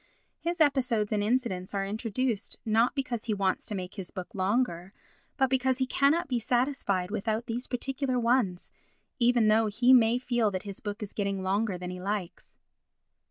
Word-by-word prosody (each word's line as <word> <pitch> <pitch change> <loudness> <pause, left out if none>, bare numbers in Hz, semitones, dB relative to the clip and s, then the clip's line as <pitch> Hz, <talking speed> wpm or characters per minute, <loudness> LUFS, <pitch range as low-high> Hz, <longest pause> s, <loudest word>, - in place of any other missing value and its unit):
His 345 +1 -3
episodes 250 -8 +2
and 210 - +1
incidents 210 -5 -1
are 195 0 0
introduced 220 +2 -2
not 225 +4 +2
because 255 -5 -3
he 220 -3 0
wants 195 -2 0
to 210 - -3
make 185 0 -5
his 190 -5 -7
book 185 +5 -8
longer 195 -2 -1 0.4
but 265 -2 +3
because 260 0 +1
he 260 - +1
cannot 285 +7 +2
be 250 -3 0
satisfied 235 -7 0
without 220 +2 -1
these 240 +1 -4
particular 260 0 -1
ones, 230 -7 +1 0.5
even 240 -2 +4
though 220 +1 +4
he 240 +5 +4
may 235 -1 +5
feel 240 -3 +1
that 185 -1 -4
his 200 -2 -7
book 210 +1 -5
is 205 - -8
getting 195 -2 -2
longer 200 +1 0
than 180 0 -6
he 180 0 -7
likes. 195 -2 -5
225 Hz, 175 wpm, -28 LUFS, 200-250 Hz, 0.5 s, may